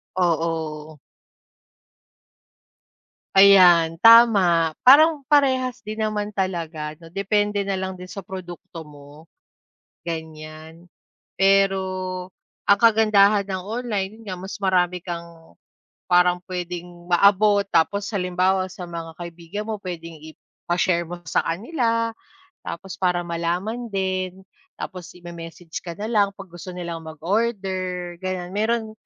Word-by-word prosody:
Oo. 160 -3 -1 2.5
Ayan, 180 -4 +7
tama. 200 -9 +6
Parang 300 +3 +6
parehas 260 -5 +2
din 215 +1 -5
naman 210 -1 -2
talaga, 165 -5 -3
'no? 165 0 -16
Depende 205 +1 0
na 195 -1 -2
lang 190 0 -3
din 180 0 -11
sa 195 -1 -8
produkto 175 -2 -9
mo, 150 +1 -15 0.7
ganyan. 160 0 -8 0.5
Pero 195 0 +4 0.9
ang 200 - +7
kagandahan 210 -2 +4
ng 185 -2 -4
online, 215 -2 -4
yun - - -15
nga 185 - -4
mas 190 +3 -8
marami 180 -2 +1
kang 170 - -9 0.5
parang 180 0 +4
puwedeng 175 -1 -7
maabot. 200 +3 +4
Tapos 195 +4 +1
halimbawa 185 -1 0
sa 180 -1 -9
mga 165 -1 -7
kaibigan 170 +5 -7
mo, 215 - -2
puwedeng 170 -4 -8
ipa-share 175 +2 -2
mo 175 +1 -8
sa - - +1
kanila 230 - -1 0.4
tapos 190 -1 -8
para 180 -2 +1
malalaman 175 +8 -3
din. 190 -2 -3 0.3
Tapos 180 -3 -8
ime-message 170 -1 -9
ka 170 -2 -8
na 210 +4 -5
lang 205 -3 +4
'pag 195 -3 -12
gusto 175 +1 -10
nilang 170 -2 -5
mag-order, 185 +1 -2
ganyan. 185 -1 -4
Meron 220 +2 -1
185 Hz, 115 wpm, -23 LUFS, 170-205 Hz, 2.5 s, Ayan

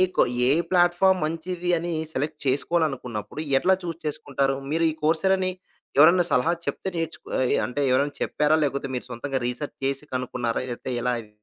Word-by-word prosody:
కొ - - +5 0.2
ఏ - - +4 0.2
ప్లాట్‌ఫామ్ 180 +1 +4
మంచిది 170 +3 -3
అని 170 +1 -3 0.2
సెలెక్ట్ 150 +3 -2
చేసుకోవాలనుకున్నప్పుడు 135 -5 -1 0.2
ఎట్లా 190 +7 +4
చూజ్ 165 -1 -5
చేసుకుంటారు. 140 -2 -1 0.2
మీరు 165 +1 +2
ఈ - - -6
కోర్స్‌ 160 +2 +2
ఎరానీ? 190 -1 +2 0.5
ఎవరైనా 170 +4 +7
సలహా 125 +7 +3
చెప్తే - - -3
నేర్చుకో 165 -1 -5
అది 130 - +2
అంటే 125 +3 -4
ఎవరైనా 140 +3 +2
చెప్పారా? 150 +1 +2
లేపోతే 140 -1 -1
మీరు 125 - -4
సొంతంగా 135 +3 -3
రీసెర్చ్ 125 +4 -5
చేసి 135 +1 -1
కనుకున్నారా? 125 -2 -2
లేతే 125 +2 -5
ఎలా 125 +1 +1
అవి? 110 -2 -11
150 Hz, 165 wpm, -25 LUFS, 130-170 Hz, 0.5 s, ఎవరైనా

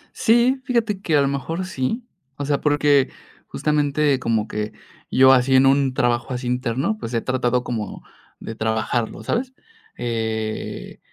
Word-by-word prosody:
Sí, 240 +3 +3
fíjate 225 -5 0
que 160 -6 +2
a - - +4
lo 140 - +2
mejor 160 +6 -3
sí. 190 - -3 0.3
O 145 - -3
sea, 145 0 0
porque, 145 -2 +3 0.4
justamente, 150 -2 +1
como 110 -3 0
que 105 0 -4 0.4
yo 130 0 +7
así 130 +1 +3
en 130 +1 +6
un 135 -1 +3
trabajo 120 +1 0
así 125 0 -4
interno, 125 - -1
pues, 120 - -6
he 115 - +1
tratado 125 -1 0
como 110 -5 -5 0.4
de 115 - -7
trabajarlo, 110 +1 -2
¿sabes?, 255 +2 -2 0.4
eh, 110 -2 -4
130 Hz, 150 wpm, -22 LUFS, 120-150 Hz, 0.4 s, yo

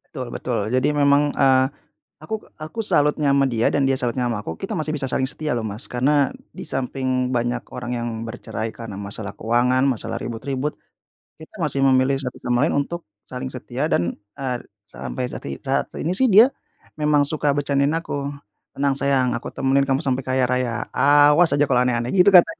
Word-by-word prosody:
Betul 130 -5 -8
betul. 125 -2 -2 0.2
Jadi 130 +3 +2
memang, 140 0 +4
eee, 130 -1 +4 0.6
aku 195 +8 -4 0.3
aku 155 +9 -5
salutnya 150 -4 +2
sama 140 0 +3
dia 115 -2 +1
dan 140 -1 +2
dia 135 - +2
salutnya 125 0 -1
sama 110 -3 -3
aku, 80 -2 -6
kita - - -4
masih 155 0 -2
bisa 135 -2 -2
saling 130 - +1
setia 155 0 -3
loh, 115 - -2
Mas. 105 +1 -5
Karena 140 +3 +2 0.3
di - - -7
samping 130 -1 -1
banyak 120 0 -1
orang 125 -1 -5
yang 120 0 -3 0.2
bercerai 115 -1 -5
karena 115 -4 -8
masalah 100 0 -5
keuangan, 125 +3 +2
masalah 120 -3 -2
ribut-ribut, 135 +4 -3 0.7
kita 160 - -13
masih 140 -3 0
memilih 130 +1 +3
satu 125 -2 -5
sama 120 0 +2
lain - - 0
untuk 170 +5 -4 0.3
saling 130 +1 -4
setia 130 +3 -3
dan, 85 0 +1 0.3
eee, 130 -3 -2 0.3
sampai 125 +4 -5
sati 70 - -6
saat 135 - 0
ini 165 +4 -1
sih 255 +7 +3
dia 225 +6 +7 0.5
memang 150 -1 +3
suka 150 0 0
bercandain 140 0 +1
aku, 145 -4 -3 0.5
"Tenang 140 0 +1
sayang, 135 -2 +2
aku 120 - -6
temenin 135 +1 +2
kamu 135 0 +2
sampai 130 -1 0
kaya 130 0 +2
raya, 125 -2 -1
awas 145 +2 +5
aja 145 - +4
kalau 130 -3 +2
aneh-aneh." 120 0 0
Gitu 180 0 +5
katanya. 180 - +8
135 Hz, 185 wpm, -22 LUFS, 125-145 Hz, 0.7 s, katanya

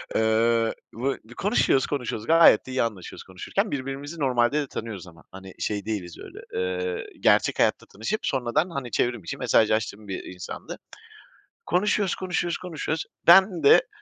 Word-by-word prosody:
Eee, 115 +1 +2 0.2
bu 130 +4 -2
b 110 - -14
konuşuyoruz 175 - +2
konuşuyoruz 120 -6 -4
gayet 165 +1 +6
de 130 - -8
iyi 130 - +1
anlaşıyoruz 105 -6 -6
konuşurken; 195 - -3
birbirimizi 140 +4 -5
normalde 130 +1 +2
de 140 - -5
tanıyoruz 105 -7 -7
ama 80 -1 -16
hani, 95 0 -11
şey 105 -2 -2
değiliz 95 -6 -4
öyle, - - -11
eee, 90 0 -2
gerçek - - +3
hayatta - - +2
tanışıp 110 - -4
sonradan 135 +6 0
hani, 135 -7 -5
çevrim 120 -5 0
içi - - -5
mesajlaştığım 110 -1 +1
bir, 95 - -5
iii, - - -9
insandı. 90 0 -8 0.9
Konuşuyoruz, 205 +1 +1
konuşuyoruz, 175 -2 -2
konuşuyoruz. 160 -3 -4 0.2
Ben 180 -2 +6
de - - +6
120 Hz, 155 wpm, -25 LUFS, 105-160 Hz, 0.9 s, gayet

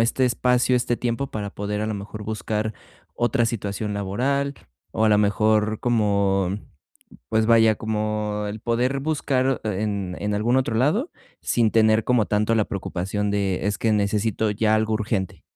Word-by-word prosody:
este 120 +3 +2
espacio, 125 +1 +2
este 120 -1 +1
tiempo 125 +3 -2
para 105 -2 -4
poder, 105 +1 -3
a 110 - -1
la 110 - -2
mejor, 105 +1 -7
buscar 110 0 -2 0.4
otra 120 0 +1
situación 105 -2 -3
laboral, 135 +8 -1 0.4
o 110 - 0
a - - +4
la 105 -1 +4
mejor, 105 +1 +2
como, 100 -5 +1 0.8
pues, 110 - +1
vaya, 115 -1 +5
como 105 -1 -2
el 105 +1 -6
poder 125 +4 0
buscar 135 -4 0
en 100 -3 -2
en 105 +1 -2
algún 110 +5 +1
otro 130 -4 +1
lado 155 - +1 0.3
sin 115 -2 +2
tener 110 0 +3
como 125 -4 +3
tanto 105 +3 +1
la 110 - +3
preocupación 100 +1 -3
de: 100 -1 -1
"Es 105 - -1
que 115 - +1
necesito 105 +1 +1
ya 110 +1 +2
algo 110 0 +1
urgente". 105 -3 -2
110 Hz, 160 wpm, -23 LUFS, 105-120 Hz, 0.8 s, vaya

